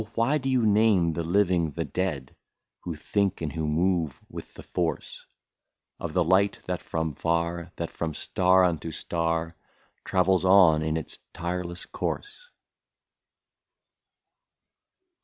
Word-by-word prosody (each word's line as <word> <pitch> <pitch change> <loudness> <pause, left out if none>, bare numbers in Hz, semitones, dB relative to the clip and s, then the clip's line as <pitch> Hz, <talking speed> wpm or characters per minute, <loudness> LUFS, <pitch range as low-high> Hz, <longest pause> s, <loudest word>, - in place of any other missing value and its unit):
why 135 +7 +2
do 135 0 -2
you 125 -3 +2
name 105 -5 +4
the 85 - -2
living 90 -1 +2
the 85 +2 -3
dead, 80 -9 -3 0.2
— - - -60
Who 85 -3 -3
think 100 +5 -1
and 80 -3 -4
who 80 -2 -2
move 85 -1 0
with - - -9
the - - -10
force - - -3 0.7
Of 85 -2 -5
the 90 - +3
light, 95 +4 +3
that 90 -1 -3
from 80 -1 -2
far, 85 +2 -1
that 85 - -4
from 80 -3 -4
star 95 0 +3
unto 85 -2 0
star. 80 +1 -2 0.5
Travels 95 -1 +2
on 95 -5 +6
in 80 0 0
its 80 - -6
tireless 85 +1 -4
course 435 +4 -5
85 Hz, 135 wpm, -26 LUFS, 80-95 Hz, 0.7 s, on